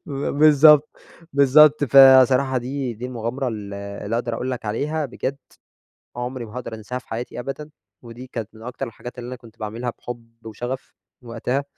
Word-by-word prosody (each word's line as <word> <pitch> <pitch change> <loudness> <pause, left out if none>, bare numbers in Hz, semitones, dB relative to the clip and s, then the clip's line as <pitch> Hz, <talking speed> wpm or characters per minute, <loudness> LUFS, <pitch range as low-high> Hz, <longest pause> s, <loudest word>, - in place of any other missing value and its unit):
ب - - -10 0.3
بالضبط، 150 0 +7 0.5
بالضبط 145 +2 +6
فصراحة 130 -1 +6
دي 130 0 -4
دي 120 +4 -6
المغامرة 125 +2 -3
ال 105 -3 -6 0.3
اللي 110 +3 -1
أقدر 120 -1 -2
أقول 125 +3 -3
لك 125 -3 -5
عليها، 145 +8 -2
بجد 135 +2 -4 0.8
عمري 125 0 -5
ما 105 - -13
هاقدر 115 -2 -6
أنساها 110 +4 -6
في 130 - -24
حياتي 120 +2 -5
أبدًا، 135 +4 -6 0.3
ودي 120 +1 -11
كانت 115 -4 -6
من 110 - -13
أكتر 125 +2 -5
الحاجات 120 +2 -10
اللي 120 - -7
أنا 130 - -6
كنت 115 -2 -17
باعملها 115 +3 -4
بحُب 120 -1 -8 0.2
وشغف 120 +4 -6 0.3
وقتها. 120 +4 -2
125 Hz, 170 wpm, -22 LUFS, 115-135 Hz, 0.8 s, بالضبط